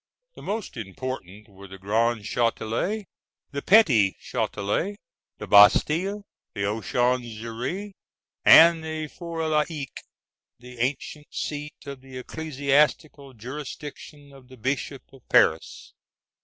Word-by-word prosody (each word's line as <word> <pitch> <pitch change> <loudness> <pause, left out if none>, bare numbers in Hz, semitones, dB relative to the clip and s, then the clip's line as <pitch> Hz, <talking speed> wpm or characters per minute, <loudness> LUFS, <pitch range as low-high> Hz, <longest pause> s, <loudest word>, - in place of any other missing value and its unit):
The - - -13
most 205 - -5
important 105 -1 -7
were 100 0 -14
the 95 0 -11
Grand 110 +4 0
Châtelet, 115 - -1 0.5
the 140 -1 -4
Petit 135 - +4
Châtelet, 105 - -2 0.4
the - - -7
Bastille, 165 - +5 0.3
the - - -4
Conciergerie, 120 - -2 0.5
and 165 0 +8
the 155 -1 -4
For 165 +1 -5
l'Evêque, 150 -2 -2 0.6
the 125 0 -13
ancient 140 +4 -3
seat 150 0 -5
of 140 -2 -8
the 130 -1 -11
ecclesiastical 145 0 -1
jurisdiction 145 +3 -9
of 135 -2 -16
the 130 0 -15
Bishop 135 +3 -3
of 135 - -16
Paris. - - +2
135 Hz, 110 wpm, -25 LUFS, 115-155 Hz, 0.6 s, and